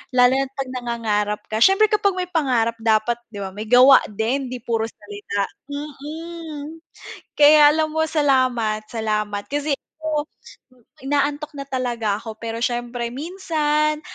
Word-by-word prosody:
lalo 250 Hz, 0 st, +6 dB
na't 270 Hz, 0 st, 0 dB
'pag 270 Hz, -2 st, -4 dB
nangangarap 215 Hz, -4 st, -1 dB
ka. 220 Hz, -, -1 dB
Syempre 390 Hz, +3 st, +5 dB
kapag 400 Hz, -3 st, +2 dB
may 360 Hz, -, -2 dB
pangarap 245 Hz, -8 st, +1 dB
dapat 225 Hz, +1 st, +2 dB
di 205 Hz, -, -8 dB
ba 190 Hz, -, -5 dB
may 215 Hz, +2 st, -6 dB
gawa 255 Hz, +2 st, +8 dB
din 245 Hz, +6 st, -1 dB
'di 250 Hz, -, -5 dB
puro 225 Hz, -2 st, -1 dB
salita, 205 Hz, -1 st, -5 dB, 0.3 s
mm, 305 Hz, +2 st, -7 dB, 0.6 s
kaya 295 Hz, 0 st, +8 dB
alam 310 Hz, 0 st, 0 dB
mo 320 Hz, -, -1 dB
salamat 255 Hz, -8 st, +1 dB
salamat 210 Hz, -2 st, -2 dB
kasi, 290 Hz, 0 st, -1 dB, 0.3 s
oh, 305 Hz, -1 st, -1 dB, 0.8 s
inaantok 290 Hz, +2 st, -1 dB
na 275 Hz, -1 st, -6 dB
talaga 240 Hz, -6 st, -1 dB
ako 220 Hz, -2 st, -8 dB
pero 230 Hz, 0 st, -4 dB
siyempre 240 Hz, -1 st, -2 dB
minsan 305 Hz, -1 st, -1 dB
260 Hz, 140 wpm, -21 LUFS, 225-300 Hz, 0.8 s, gawa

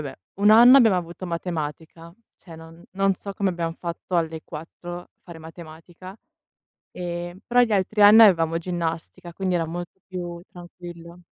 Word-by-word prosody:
beh, -, -, -18 dB, 0.2 s
1 205 Hz, -, +4 dB
anno 240 Hz, +5 st, +8 dB
abbiamo 220 Hz, -7 st, +4 dB
avuto 175 Hz, +1 st, -6 dB
matematica, 165 Hz, -1 st, -6 dB, 0.3 s
cioè 165 Hz, -3 st, -13 dB
non 165 Hz, +1 st, -14 dB
non 195 Hz, 0 st, +1 dB
so 200 Hz, +2 st, -9 dB
come 195 Hz, -2 st, 0 dB
abbiamo 170 Hz, -2 st, -4 dB
fatto 175 Hz, +1 st, -5 dB
alle 160 Hz, -1 st, -2 dB
4 175 Hz, +2 st, -9 dB
fare 170 Hz, -2 st, -12 dB
matematica, 165 Hz, +3 st, -12 dB, 0.8 s
ehm, 175 Hz, 0 st, -6 dB
però 245 Hz, +1 st, +2 dB
gli 230 Hz, -3 st, +1 dB
altri 205 Hz, +2 st, 0 dB
anni 210 Hz, +2 st, +8 dB
avevamo 165 Hz, -5 st, +4 dB
ginnastica, 170 Hz, 0 st, -5 dB
quindi 185 Hz, -1 st, -2 dB
era 165 Hz, -1 st, 0 dB
molto 175 Hz, +3 st, -8 dB
più 175 Hz, -2 st, -7 dB
tranquillo, 175 Hz, -1 st, -12 dB
175 Hz, 155 wpm, -23 LUFS, 165-190 Hz, 0.8 s, anno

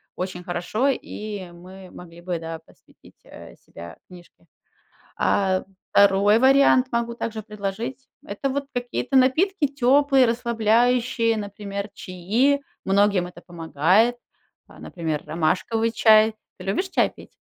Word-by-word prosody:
очень 180 Hz, -1 st, -5 dB
хорошо, 180 Hz, +9 st, -1 dB
и 210 Hz, -7 st, -5 dB
мы 185 Hz, +2 st, -13 dB
могли 170 Hz, -1 st, -13 dB
бы, 175 Hz, 0 st, -3 dB
да, 165 Hz, 0 st, -7 dB
посвятить, 160 Hz, -, -23 dB
э, -, -, -13 dB
себя 85 Hz, 0 st, -11 dB
книжке. 180 Hz, -1 st, -17 dB, 0.7 s
А 190 Hz, -2 st, +1 dB, 0.3 s
2 200 Hz, +2 st, +4 dB
вариант 265 Hz, 0 st, +4 dB
могу 235 Hz, 0 st, -1 dB
также 225 Hz, -2 st, -5 dB
предложить- 215 Hz, +5 st, -6 dB, 0.2 s
это 205 Hz, +7 st, -3 dB
вот 280 Hz, +1 st, -3 dB
какие-то 245 Hz, +2 st, -3 dB
напитки 310 Hz, +7 st, +2 dB
теплые, 275 Hz, 0 st, +3 dB
расслабляющие, 235 Hz, 0 st, +1 dB
например, 200 Hz, 0 st, -6 dB
чаи, 220 Hz, +11 st, 0 dB, 0.2 s
многим 195 Hz, -2 st, +2 dB
это 175 Hz, -1 st, -13 dB
помогает, 175 Hz, +7 st, +1 dB, 0.5 s
а, -, -, -17 dB
например, 160 Hz, -4 st, -4 dB
ромашковый 180 Hz, +8 st, -1 dB
чай. 220 Hz, -1 st, +4 dB, 0.2 s
Ты 185 Hz, -, -11 dB
любишь 365 Hz, -, -1 dB
чай -, -, +2 dB
пить? -, -, -14 dB
210 Hz, 125 wpm, -23 LUFS, 180-245 Hz, 0.7 s, 2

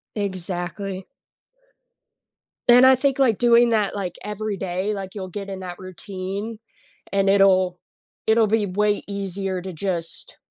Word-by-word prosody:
Exactly. 190 Hz, -1 st, -3 dB, 1.6 s
And 245 Hz, +1 st, +8 dB
I 260 Hz, 0 st, +8 dB
think, 270 Hz, +1 st, +1 dB
like, 250 Hz, -7 st, +3 dB
doing 240 Hz, 0 st, +5 dB
that, 215 Hz, -3 st, +1 dB
like, 185 Hz, -4 st, -4 dB
every 210 Hz, 0 st, -3 dB
day, 190 Hz, +2 st, -2 dB
like, 195 Hz, -1 st, -6 dB
you'll 190 Hz, -2 st, -5 dB
get 200 Hz, +2 st, -6 dB
in 190 Hz, -1 st, -6 dB
that 180 Hz, -1 st, -7 dB
routine, 195 Hz, +4 st, -6 dB, 0.5 s
and 195 Hz, 0 st, +1 dB
it'll 185 Hz, -2 st, +4 dB, 0.5 s
it'll 220 Hz, 0 st, +5 dB
be 215 Hz, 0 st, +2 dB
way 205 Hz, +2 st, +1 dB
easier 195 Hz, -1 st, -3 dB
to, 185 Hz, 0 st, -7 dB
just, 170 Hz, -1 st, -3 dB
195 Hz, 135 wpm, -23 LUFS, 185-215 Hz, 1.6 s, And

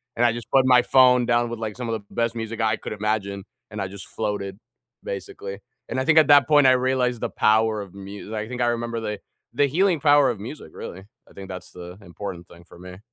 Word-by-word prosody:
and 120 Hz, -, +2 dB
I 120 Hz, -, +4 dB
just 120 Hz, -1 st, -8 dB
put 135 Hz, -1 st, +4 dB
my 125 Hz, -1 st, +6 dB
phone 125 Hz, -2 st, +5 dB
down 120 Hz, 0 st, +2 dB
with, 115 Hz, -, -5 dB
like, 110 Hz, -2 st, -5 dB
some 125 Hz, -2 st, -4 dB
of -, -, -1 dB
the 100 Hz, -, -20 dB
best 115 Hz, 0 st, 0 dB
music 115 Hz, 0 st, -5 dB
I 110 Hz, -1 st, +2 dB
could -, -, -8 dB
imagine, 100 Hz, -2 st, -2 dB, 0.3 s
and 105 Hz, -, -7 dB
I 95 Hz, -, -2 dB
just 100 Hz, +1 st, -10 dB
floated, 100 Hz, -3 st, -4 dB, 0.5 s
basically, 100 Hz, 0 st, -6 dB, 0.3 s
and 130 Hz, -, -2 dB
I 130 Hz, -, -1 dB
think 160 Hz, 0 st, +4 dB
at 155 Hz, -, +7 dB
that 145 Hz, -3 st, +7 dB
point 145 Hz, -2 st, +5 dB
I -, -, +7 dB
realized 125 Hz, -2 st, +1 dB
the -, -, -1 dB
power 110 Hz, 0 st, +2 dB
of 95 Hz, -2 st, -10 dB
mu 100 Hz, +2 st, -9 dB
I 110 Hz, 0 st, -3 dB
think 125 Hz, +1 st, -5 dB
I 120 Hz, -, +2 dB
remember 115 Hz, -1 st, -2 dB
the 105 Hz, -2 st, -4 dB, 0.3 s
the 140 Hz, +3 st, +3 dB
healing 175 Hz, +2 st, +2 dB
power 145 Hz, -2 st, +5 dB
of 115 Hz, -, -3 dB
music, 110 Hz, -, -9 dB
really. 95 Hz, +2 st, -8 dB, 0.3 s
I -, -, -19 dB
think 95 Hz, -1 st, -10 dB
that's 90 Hz, -1 st, -8 dB
the 90 Hz, 0 st, -10 dB
important 90 Hz, -1 st, -8 dB
thing 85 Hz, -, -16 dB
for -, -, -15 dB
me. 90 Hz, 0 st, -10 dB
115 Hz, 240 wpm, -23 LUFS, 100-125 Hz, 0.5 s, at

